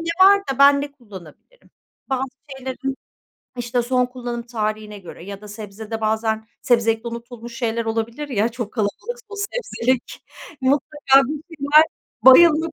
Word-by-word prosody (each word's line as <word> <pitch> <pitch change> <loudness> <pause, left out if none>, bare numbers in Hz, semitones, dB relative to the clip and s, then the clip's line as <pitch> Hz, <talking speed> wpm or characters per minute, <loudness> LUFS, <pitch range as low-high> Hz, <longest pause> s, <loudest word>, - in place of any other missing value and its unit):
ne 335 0 -2 0.2
var 400 0 +7
da 265 - -9
ben 280 0 +7
ne 285 0 -5
kullanabilirim? 210 - -15 0.4
Bazı 265 0 -1 0.3
şeylerin 265 +1 -4 0.6
işte, 245 0 -1
son 250 +1 +1
kullanım 245 -1 -6
tarihine 215 -3 -4
göre 175 -2 -11
ya 200 +1 -8
da 210 - -12
sebzede 215 +1 -7
bazen 220 0 0 0.2
sebzelikte 230 -1 +2
unutulmuş 235 0 -9
şeyler 230 -2 -1
olabilir 230 +6 -3
ya, 225 -3 +1
çok 235 -3 -6
kalabalıksa 435 - -4
o 415 - -9
sebzelik. 400 - -2 0.4
Mutlaka 275 0 +3
bir 300 0 -4
şeyler 290 +3 +6 0.4
bayılmak 320 +4 +7
240 Hz, 140 wpm, -21 LUFS, 220-280 Hz, 0.6 s, var